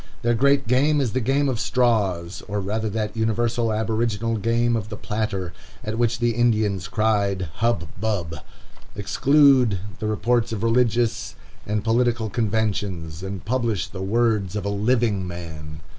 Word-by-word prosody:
Their 120 0 +3
great 140 +2 +3
game 145 +5 +3
is 125 -6 -1
the 130 - +1
game 135 +4 +1
of 125 -4 -1
straws, 100 -10 0
or 105 0 -2
rather 110 +3 -2
that 105 0 -3
universal 115 +1 0
aboriginal 110 +1 -1
game 115 +2 +1
of 110 -2 -3
the 105 - -6
platter, 100 -5 -3 0.3
at 110 +1 -3
which 120 0 +1
the 120 -1 +1
Indians 110 -6 +1
cried 100 -4 0
hub, 115 -8 0
bub! 95 -7 -2 0.6
Exclude 130 0 +4 0.2
the 110 - -2
reports 115 +2 +1
of 110 -1 -3
religious 115 -1 +1 0.3
and 105 0 -1
political 115 -1 +1
conventions, 100 -7 -1
and 95 -3 -6
publish 115 -4 0
the 95 - -7
words 105 -2 +1
of 105 - -3
a - - 0
living 105 -2 +1
man. 80 -3 -8
110 Hz, 150 wpm, -23 LUFS, 100-120 Hz, 0.6 s, Exclude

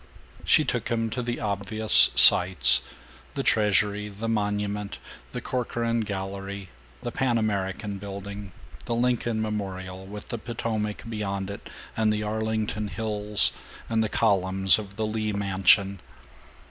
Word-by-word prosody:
She - - +4
took - - -2
him 115 -1 -1
to 125 - -2
the 120 0 -3
obvious 105 +1 +3
"sights" 75 -9 +6 0.5
the - - -2
Treasury, 105 0 +2
the 105 +3 -6
Monument, 105 -1 -2 0.3
the - - -5
Corcoran 115 -2 -2
Gallery, 100 -2 -5 0.3
the - - -3
Pan 125 -3 0
American 100 -1 -2
Building, 100 0 -7 0.3
the 115 - -2
Lincoln 120 -2 0
Memorial, 95 -3 -5
with 105 +1 -9
the 120 - -4
Potomac 110 -2 -3
beyond 100 -3 -3
it 100 - -9 0.3
and 110 -1 +2
the 105 0 -1
Arlington 110 0 -2
hills 105 - +2 0.4
and 110 -1 +1
the 110 - -2
columns 95 -2 +3
of 100 -2 -9
the 110 +1 -2
Lee 110 0 -2
Mansion. 100 0 +3
105 Hz, 135 wpm, -26 LUFS, 100-110 Hz, 0.5 s, sights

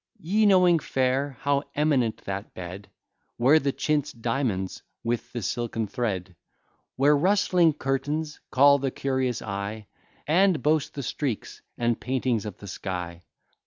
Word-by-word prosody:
Ye 205 +4 +2
knowing 180 -4 +5
fair, 135 0 0
how 140 0 +2
eminent 140 -7 +1
that 100 +1 -5
bed, 95 +2 -8 0.5
Where 135 +6 +5
the 140 -2 0
chintz 150 +1 0
diamonds 115 -5 -2 0.2
with 120 0 -2
the 120 -3 -4
silken 115 +1 -2
thread, 95 -5 -3 0.6
Where 145 +3 +4
rustling 180 0 +3
curtains 150 +3 -2
call 140 +2 +6
the 135 0 0
curious 130 -2 -1
eye, 100 +1 -4 0.4
And 180 +2 +3
boast 150 -1 +1
the 140 - -4
streaks 130 -4 -4 0.2
and 120 -1 0
paintings 125 -4 -1
of 105 - -7
the 100 - -11
sky! 90 -3 -5
130 Hz, 135 wpm, -26 LUFS, 110-150 Hz, 0.6 s, call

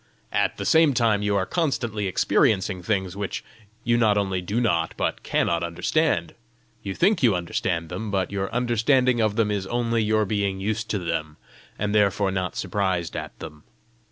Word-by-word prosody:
At - - 0
the - - -4
same 160 -4 +4
time 115 -4 +2
you 105 0 0
are 95 -1 +1
constantly 120 - -1
experiencing 95 +1 +1
things 95 -1 -1
which 100 -1 -4 0.4
you 120 0 +2
not 110 -3 +3
only 95 -2 0
do 100 +6 -2
not, 85 -9 0
but - - -1
cannot 85 -1 0
understand. 85 - 0 0.5
You 95 - -5
think 195 +1 +2
you 115 -7 +4
understand 85 -1 -2
them, 100 +5 -5
but 95 -1 -1
your 95 -1 -3
understanding 125 +1 +2
of 110 -2 +1
them 110 -2 +1
is 100 -2 -2
only 115 0 0
your 110 0 +2
being 100 -1 -1
used 110 +3 -2
to 105 - 0
them, 80 -4 -3 0.4
and 105 0 -1
therefore 100 -2 +2
not 95 -1 -2
surprised 95 -3 -1
at - - -6
them. 75 -2 -10
100 Hz, 175 wpm, -24 LUFS, 95-115 Hz, 0.5 s, same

